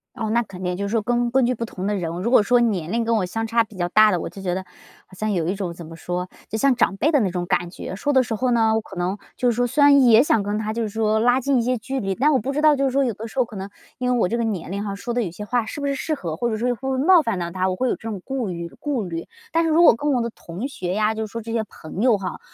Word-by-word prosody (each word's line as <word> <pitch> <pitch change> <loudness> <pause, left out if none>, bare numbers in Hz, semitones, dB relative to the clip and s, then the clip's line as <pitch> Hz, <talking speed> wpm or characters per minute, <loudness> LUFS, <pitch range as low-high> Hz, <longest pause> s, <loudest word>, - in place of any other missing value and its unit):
哦， 225 -4 -3
那 235 - +3
肯 185 -3 -10
定 180 0 -1
就 200 +2 -3
是 - - -4
说 225 -1 +1
根 240 +2 0
根 260 +1 +3
据 250 - +1
不 235 - -4
同 190 -4 -6
的 205 +1 0
人， 175 -4 -2
如 235 - 0
果 255 - +7
说 245 +4 +3
年 195 -8 0
龄 230 +1 +1
跟 230 - +2
我 205 -4 +1
相 225 +5 -3
差 230 +1 +2
比 220 -1 -15
较 175 -1 0
大 215 +3 +6
的， 180 -4 +1
我 - - -4
就 195 - -10
觉 180 -1 -1
得 190 - -2 0.4
好 - - -23
像 215 +3 -2
有 170 -4 0
一 185 - 0
种 195 -3 -4
怎 170 - -9
么 165 +1 -10
说， 180 +2 -4 0.2
就 220 - -2
像 265 +3 +3
长 200 -4 +1
辈 310 +10 +2
的 290 - +4
那 205 -6 +1
种 175 0 -3
感 175 -1 0
觉， 185 - -7
说 285 +9 -1
的 260 -2 +4
时 225 - -4
候 250 +4 0
呢 225 -2 +3
我 220 - +1
可 195 - -12
能， 180 +3 -2 0.2
就 245 -1 +2
是 230 - -3
说 245 0 +1
虽 290 +4 +2
然 285 -1 +7
也 230 +1 +7
想 225 -7 +2
跟 205 +1 -2
他 215 0 -2
就 230 - -2
是 220 - -1
说 220 0 +1
拉 245 +3 +3
近 270 +1 +1
一 - - +2
些 250 +2 0
距 265 +4 -4
离， 195 -3 -2
但 295 +7 +3
我 265 - +3
不 260 +6 -3
知 295 +2 -1
道 305 -1 +6
就 275 0 0
是 265 - +1
说 275 +2 +2
有 235 - -1
的 220 +3 -7
时 225 - -14
候 255 - +3
可 225 -2 -12
能 195 +1 -6 0.3
因 250 0 0
为 245 - +2
我 205 - +3
这 235 +5 -1
个 235 - +1
年 195 -6 -3
龄 200 +1 -3
啊 200 -1 -4
说 200 +4 -5
的 245 - +1
有 200 - -2
些 195 +5 -8
话 235 +1 0
是 - - -6
不 285 - -3
是 280 - 0
适 310 +3 -2
合， 165 - -5
或 240 +8 -1
者 220 - -2
说 240 +3 -1
会 245 - +2
不 265 - -2
会 260 - -1
冒 340 +6 +6
犯 230 -9 -2
到 170 -1 -3
他， 185 +1 0
我 185 - -1
会 255 +7 0
有 - - +1
这 225 - -7
种 205 -3 -4
顾 265 -4 -2
虑 170 -2 -5
顾 280 -6 -2
虑。 165 -1 -5 0.2
但 330 - +2
是 325 - +1
如 325 +2 +5
果 285 - +7
跟 290 +5 -1
我 250 - +1
的 235 -1 -3
同 185 +9 -6
学 185 -10 -4
呀， 215 +1 +2
就 220 0 -3
是 - - -18
说 230 - -5
这 230 - -6
些 225 -1 0
朋 190 -2 -8
友 235 -3 +4
哈， 185 -2 -5
220 Hz, 380 characters per minute, -22 LUFS, 195-250 Hz, 0.4 s, 果